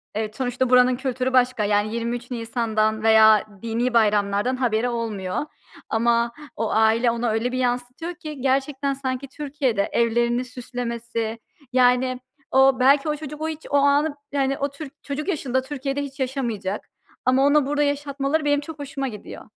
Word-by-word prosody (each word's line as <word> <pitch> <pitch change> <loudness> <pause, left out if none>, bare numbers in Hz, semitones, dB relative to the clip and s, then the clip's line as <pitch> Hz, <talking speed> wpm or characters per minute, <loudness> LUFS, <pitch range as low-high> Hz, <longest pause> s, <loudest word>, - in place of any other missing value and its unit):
evet, 215 0 -3
sonuçta 255 0 -1
buranın 250 0 +5
kültürü 260 0 -2
başka 250 -3 +3
yani 205 +2 +1
23 235 +1 -3
Nisan'dan 220 -2 -1
veya 220 -1 +6 0.2
dini 235 +2 -1
bayramlardan 210 +1 +2
haberi 245 -2 0
olmuyor. 215 -6 -3 0.5
Ama 235 +1 +2 0.2
o 225 -1 -2
aile 220 +2 +3
ona 235 0 -1
öyle 225 +3 0
bir 255 - -2
yansıtıyor 250 +7 -2
ki 305 -4 -8
gerçekten 275 +1 0
sanki 265 0 -4
Türkiye'de 270 -7 -2
evlerini 235 +1 +1
süslemesi, 235 -2 -4 0.3
yani, 250 0 +3 0.3
o 265 0 +5
belki 275 +4 +4
o 300 - 0
çocuk 300 0 -8
o 315 - -1
hiç 315 0 -7
o - - 0
anı 285 +2 +3 0.2
yani 275 -1 0
o 280 0 0
tür 280 0 -9
çocuk 290 +3 -4
yaşında 270 -8 0
Türkiye'de 275 +1 -3
hiç 280 0 -9
yaşamayacak. 240 -7 -3 0.4
Ama 260 +2 +4
ona 290 0 +4
burada 295 +1 +1
yaşatmaları 285 +1 -1
benim 290 0 +3
çok 310 0 -9
hoşuma 275 -1 -4
gidiyor. 210 -5 -9
255 Hz, 155 wpm, -23 LUFS, 230-275 Hz, 0.5 s, veya